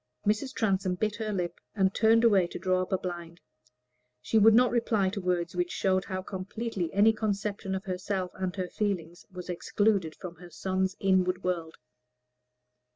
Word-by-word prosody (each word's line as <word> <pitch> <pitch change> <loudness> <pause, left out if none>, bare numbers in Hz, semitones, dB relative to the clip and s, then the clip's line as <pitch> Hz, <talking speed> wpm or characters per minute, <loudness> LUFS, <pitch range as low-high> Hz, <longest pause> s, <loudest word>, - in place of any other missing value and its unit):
Mrs. 215 +6 +1
Transome 190 -4 +1
bit 210 +3 -1
her 220 -2 -3
lip, 180 -4 -3 0.2
and 190 -2 +2
turned 225 +1 +4
away 200 -6 +5
to - - -7
draw 185 0 +1
up 185 - -4
a 190 - +3
blind. 170 -2 -6 0.8
She 220 - +2
would 220 +1 +7
not 250 +1 +5
reply 220 -5 +2
to 200 +1 -4
words 180 -1 -1
which 175 0 0
showed 185 0 +1
how 185 -1 -4
completely 195 -1 -4
any 210 +3 +5
conception 205 -2 -2
of 190 - -4
herself 185 0 -3
and 185 -1 -3
her 185 -2 -2
feelings 175 -5 -3
was 180 -1 -8
excluded 185 -1 0
from 175 -2 -9
her 175 +1 -12
son's 190 +2 -1
inward 185 -1 +2
world. 170 -3 -2
190 Hz, 170 wpm, -29 LUFS, 180-210 Hz, 0.8 s, would